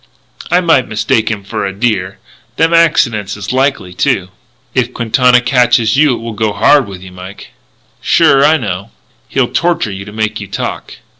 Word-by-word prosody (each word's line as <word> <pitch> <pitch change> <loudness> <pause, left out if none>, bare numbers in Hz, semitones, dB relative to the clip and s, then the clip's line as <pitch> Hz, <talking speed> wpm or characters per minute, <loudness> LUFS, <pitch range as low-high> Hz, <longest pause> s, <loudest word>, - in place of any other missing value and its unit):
"I 180 +1 +3
might 160 -8 +2
mistake 110 0 0
him 105 -3 -4
for 100 - -4
a 100 - -2
deer. 95 -3 -2 0.4
Them 165 +1 +2
accidents 115 -12 +2
is 100 +4 -5
likely, 130 -9 -1
too." 90 0 -1 0.4
"If 125 -1 -1
Quintana 125 +1 +3
catches 125 -3 +2
you 145 -2 +3
it - - -8
will 115 0 -6
go 110 -1 -1
hard 140 +2 +3
with 95 -2 -10
you, 95 - -11
Mike." 90 +2 -11 0.5
"Sure. 135 0 +3
I 155 +2 +4
know." 100 - -5 0.4
"He'll 130 -3 0
torture 170 -10 0
you 95 0 -7
to 105 - -10
make 110 0 -2
you 100 - -7
talk." 100 - -5
115 Hz, 175 wpm, -13 LUFS, 100-135 Hz, 0.5 s, I